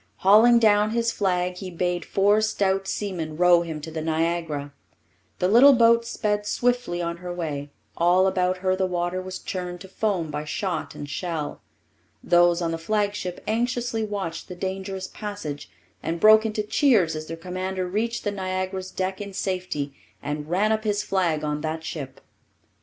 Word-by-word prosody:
Hauling 220 +5 +7
down 210 -2 +4
his 230 +1 0
flag, 180 -3 0
he 185 0 -6
bade 175 -1 -2
four 205 +2 +3
stout 195 -3 0
seamen 170 -8 -3
row 175 0 +6
him 160 -2 -5
to 160 +2 -7
the 160 0 -4
Niagara. 160 -2 -1 0.6
The 180 - +1
little 245 +8 +8
boat 230 -1 +4
sped 210 -2 -1
swiftly 245 -9 0
on 170 0 -3
her 180 0 -6
way; 150 -5 -4 0.3
all 175 +2 +4
about 185 -1 +1
her 185 0 +3
the 190 0 0
water 175 0 -2
was 185 0 -6
churned 180 -1 -5
to 190 - -9
foam 190 -5 -1
by 150 0 -3
shot 170 +2 -3
and 145 - -7
shell. 155 +1 -4 0.6
Those 175 0 +4
on 165 - 0
the 165 - -3
flagship 205 0 -2
anxiously 235 0 -1
watched 195 -6 -4
the 180 - -8
dangerous 190 +1 -4
passage, 205 -9 -6 0.3
and 165 +1 -3
broke 215 +3 +7
into 215 -1 -2
cheers 210 - +3
as 155 0 -6
their 165 - -6
commander 185 +2 -3
reached 220 +6 -2
the 205 - -1
Niagara's 185 -1 -3
deck 190 +1 -3
in 200 -1 -7
safety 180 -8 -3 0.3
and 150 +1 -5
ran 200 +5 +2
up 220 0 0
his 205 -1 0
flag 170 -5 0
on 150 0 -2
that 160 +1 -3
ship. 135 -5 -6
185 Hz, 170 wpm, -24 LUFS, 170-205 Hz, 0.6 s, little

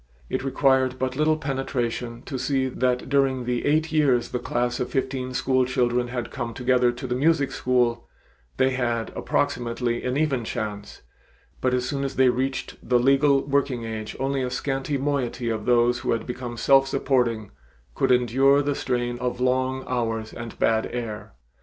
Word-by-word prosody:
It - - -1
required 130 -1 +2
but 130 0 -2
little 155 +2 +2
penetration 125 -4 -3
to 135 - -5
see 130 0 0
that 125 0 0
during 135 -3 +1
the 120 +1 -1
eight 155 +2 +2
years 135 -6 +2
the 125 - -2
class 120 0 -1
of 125 - -2
fifteen 130 -1 -2
school 130 0 +2
children 125 -1 +1
had 120 -1 -4
come 115 -1 -5
together 125 -1 +2
to 120 +2 -8
the 125 - -2
music 145 +2 +2
school, 120 -2 0 0.5
they 130 0 +3
had 120 -3 -1
approximately 120 0 -1
an 125 +2 -1
even 145 -5 +1
chance, 105 -2 -5 0.6
but 130 0 +2
as 125 0 -1
soon 140 -2 -2
as 135 - -3
they 130 -1 +5
reached 130 +2 -2
the 125 +1 +2
legal 135 +2 +4
working 140 -3 0
age 110 -1 -5
only 135 0 0
a 125 - -1
scanty 135 +3 -2
moiety 135 -4 -1
of 110 0 -4
those 120 0 +3
who 115 - 0
became 120 0 -6
self 135 +2 +4
supporting 125 -6 0 0.4
could - - +1
endure 135 +3 +4
the 145 0 0
strain 120 -2 -2
of 125 0 -2
long 130 +1 0
hours 115 -3 -2
and 115 -1 -8
bad 110 -1 +2
air. 115 - -5
125 Hz, 170 wpm, -24 LUFS, 120-135 Hz, 0.6 s, they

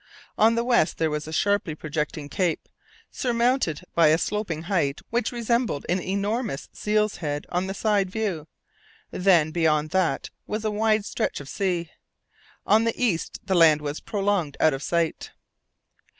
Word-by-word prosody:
On 225 +2 +4
the 235 - +1
west 235 -9 +2
there 160 -1 0
was 150 0 -3
a - - -6
sharply 200 -2 +1
projecting 150 -1 -4
cape, 175 0 -1 0.4
surmounted 240 - 0
by 165 -2 +5
a 155 +1 +5
sloping 180 -5 -2
height 165 -7 0
which 235 -1 0
resembled 235 - -1
an 180 +2 +1
enormous 200 - -2
seal's 210 0 0
head 145 -3 -3
on 180 +2 -1
the 195 - -4
side 205 -3 +1
view; 185 -7 -3 0.6
then 175 -5 +3
beyond 155 -2 +1
that 180 -7 0 0.2
was 215 +1 -3
a 215 - +1
wide 215 0 +1
stretch - - -2
of 145 - -9
sea. 175 -1 -2 0.7
On 215 +2 +4
the 230 0 -1
east 215 -10 -1
the 195 - 0
land 165 -4 +6
was 150 0 -4
prolonged 195 -8 -1
out 155 - +4
of 135 - -4
sight. 170 -1 -1
185 Hz, 160 wpm, -25 LUFS, 155-215 Hz, 0.7 s, land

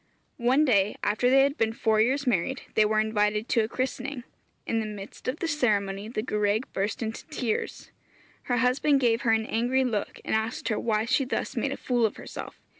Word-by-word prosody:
One 260 +6 +4
day, 205 -6 +3
after 215 +4 +2
they 270 +1 +6
had 280 +1 0
been 225 0 +1
four 220 -1 +2
years 270 +5 +1
married, 245 +3 0
they 215 - +4
were 215 0 +2
invited 210 0 +1
to 230 - +3
a - - -1
christening. 255 +1 -3 0.4
In 225 - 0
the 220 - -2
midst 205 -2 -9
of 255 +4 -1
the 335 - -2
ceremony 210 -9 0
the 220 -1 -3
gwraig 210 +1 0
burst 205 +4 -2
into 220 0 -5
tears. 255 -8 -3 0.5
Her 245 - 0
husband 255 +4 +3
gave 235 -2 +2
her 230 - +2
an 220 0 +2
angry 245 +4 +1
look, 225 -5 -2
and - - -2
asked 220 +3 -1
her 215 - 0
why 220 -1 0
she 255 +3 +2
thus 255 - -3
made - - -1
a - - -3
fool 240 -3 +1
of - - -9
herself. - - -8
225 Hz, 205 wpm, -27 LUFS, 215-255 Hz, 0.5 s, they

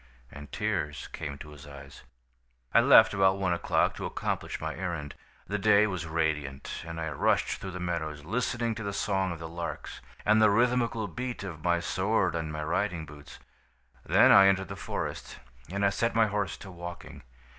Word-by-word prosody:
"And 75 +1 -11
tears 85 -9 -2
came 70 -4 -5
to 75 +1 -10
his 75 +1 -12
eyes. 70 -1 -12 0.7
"I - - +7
left - - +7
about 95 -1 +3
one 95 -2 0
o'clock 85 - +1
to - - -4
accomplish - - -3
my - - -4
errand. 85 -6 -4 0.3
"The 105 +1 -3
day 105 0 +5
was 90 -5 -3
radiant, 75 -4 -2
and 80 0 -6
I 80 -1 -2
rushed 70 - +1
through 95 - -5
the 90 0 -6
meadows, 80 -4 -3
listening 120 +3 -1
to 110 +1 -6
the 100 -1 -3
song 95 -2 0
of 85 - -5
the 80 0 -7
larks, 85 +1 -6 0.2
and 110 +1 +5
the 110 - +6
rhythmical 115 0 +1
beat 120 +7 -5
of 80 -6 -7
my 85 -1 +2
sword 95 -1 0
on 80 -2 -3
my 75 0 -4
riding 85 0 -1
boots. 75 -1 -12 0.7
"Then - - +5
I 95 - +8
entered 95 -1 +2
the - - -5
forest, - - -5 0.3
and 100 +1 0
I 100 - +3
set 115 +4 -1
my 115 -1 +5
horse 100 -6 -2
to 95 - -10
walking. 85 0 -9
90 Hz, 190 wpm, -29 LUFS, 80-100 Hz, 0.7 s, I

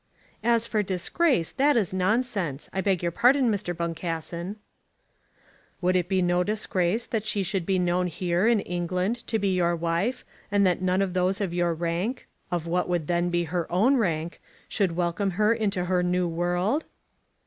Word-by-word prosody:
"As 235 0 +3
for 220 -2 0
disgrace, 190 - +1
that 280 0 +3
is 200 -5 0
nonsense. 190 - -1
I 190 - 0
beg 190 -3 0
your 170 - 0
pardon, 250 +5 +4
Mr. 190 -4 -3
Boncassen." 170 +2 -4 1.2
"Would 185 0 +1
it 180 -1 +1
be 190 -2 +2
no 175 0 +2
disgrace 210 0 0
that 220 -3 -2
she 210 -2 0
should 190 -2 -2
be 190 -1 +2
known 180 0 +1
here, 175 +3 0
in 230 -3 +3
England, 180 +5 -1
to 225 - 0
be 200 -2 0
your 175 -1 +2
wife, 170 +8 -1 0.3
and 200 -1 +3
that 180 -1 +1
none 185 +1 +2
of 185 -2 -3
those 185 +2 +1
of 195 -4 -2
your 175 -1 +1
rank, 175 +9 -2 0.2
of 175 -2 -2
what 180 +2 -1
would 175 -3 0
then 175 +2 0
be 175 0 +1
her 170 +1 -3
own 215 +10 +4
rank, 170 -8 -1 0.3
should 190 -5 0
welcome 175 +3 0
her 215 +1 +4
into 205 -5 -1
her 180 0 +1
new 180 0 +1
world?" 175 - 0
180 Hz, 180 wpm, -26 LUFS, 175-210 Hz, 1.2 s, pardon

